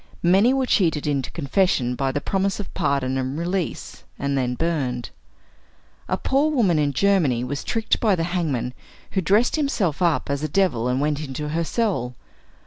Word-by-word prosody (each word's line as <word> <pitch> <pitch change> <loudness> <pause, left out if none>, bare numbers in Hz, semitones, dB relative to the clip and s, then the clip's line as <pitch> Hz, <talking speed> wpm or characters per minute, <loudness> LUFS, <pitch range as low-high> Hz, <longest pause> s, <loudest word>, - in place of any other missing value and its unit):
Many 195 +8 +5
were 265 0 +1
cheated 165 - +1
into 140 -3 -1
confession 140 -5 +1
by 135 +1 -1
the 145 - -1
promise 195 +5 -1
of 205 - -7
pardon 135 -1 0
and 130 +2 -3
release, 175 +2 -3
and 140 0 -1
then 125 -2 0
burned. 135 -6 -2 1.0
A - - +1
poor 280 +3 +1
woman 210 - +2
in 145 -1 +1
Germany 155 -9 +2
was 140 +3 -4
tricked 225 -1 0
by 210 -4 +3
the 165 - -1
hangman, 160 -9 -1 0.4
who 190 - 0
dressed 210 - +2
himself 205 - 0
up 170 -3 +2
as 140 0 -2
a 155 - -2
devil 165 -12 +1
and 125 +1 0
went 145 0 0
into 150 +1 -5
her 165 +2 0
cell. 165 - -1
160 Hz, 175 wpm, -23 LUFS, 135-195 Hz, 1.0 s, Many